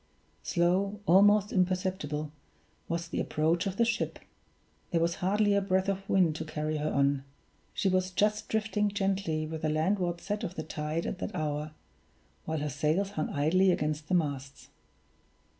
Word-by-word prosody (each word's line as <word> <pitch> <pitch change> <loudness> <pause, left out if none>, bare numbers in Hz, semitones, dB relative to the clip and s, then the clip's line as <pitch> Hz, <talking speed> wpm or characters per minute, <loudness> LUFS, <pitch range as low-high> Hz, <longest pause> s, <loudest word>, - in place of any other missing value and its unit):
Slow, 190 +4 +1
almost 205 +3 +5
imperceptible, 180 -5 -1 0.6
was 170 0 -2
the - - -3
approach 165 +4 +1
of 195 0 -4
the 235 - +4
ship 235 -1 -1 0.7
there 170 - +1
was 170 +1 +1
hardly 205 +3 +2
a 200 - +3
breath 190 0 +1
of 195 0 -3
wind 180 -5 +3
to 160 - -3
carry 155 0 -3
her 150 +1 -1
on 140 0 +2 0.5
she - - -1
was 185 0 +2
just 210 +3 +1
drifting 210 -1 +1
gently 195 -6 -1
with 160 0 -5
the 155 - 0
landward 175 +2 0
set 205 +4 -3
of 185 -4 -4
the 160 - -4
tide 155 +1 -3
at 185 - -4
that - - -4
hour, 150 0 -2 0.7
while 160 0 -2
her 150 - -1
sails 155 +8 0
hung 155 -6 -2
idly 175 +7 +3
against 150 -2 -1
the 185 - +2
masts. 140 -5 -2
175 Hz, 165 wpm, -30 LUFS, 155-195 Hz, 0.7 s, almost